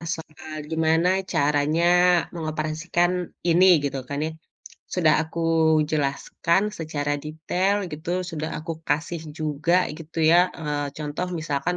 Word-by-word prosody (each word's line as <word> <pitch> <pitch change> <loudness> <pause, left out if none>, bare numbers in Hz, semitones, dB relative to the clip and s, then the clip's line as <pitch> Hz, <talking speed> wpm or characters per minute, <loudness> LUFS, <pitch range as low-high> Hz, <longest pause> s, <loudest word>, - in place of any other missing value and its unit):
soal 155 -1 -10
gimana 160 +2 +2 0.2
caranya 150 +2 +2 0.5
mengoperasikan 160 +2 -1 0.4
ini 175 +3 +5 0.2
gitu 140 -1 -2
kan 145 - -3
ya, 160 - -3 0.6
sudah 165 -4 +4
aku 160 +1 -6 0.5
jelaskan 155 +5 0 0.2
secara 145 -2 -2
detail 180 +6 0 0.2
gitu 155 +3 -5 0.2
sudah 155 -1 -4
aku 165 +2 -4 0.2
kasih 155 +3 -1 0.2
juga 155 +4 +1
gitu 165 0 -9
ya, 175 +2 +5
eee, 145 -2 -2
contoh 150 +4 -3
misalkan 155 +3 -1
155 Hz, 115 wpm, -24 LUFS, 150-170 Hz, 0.6 s, ini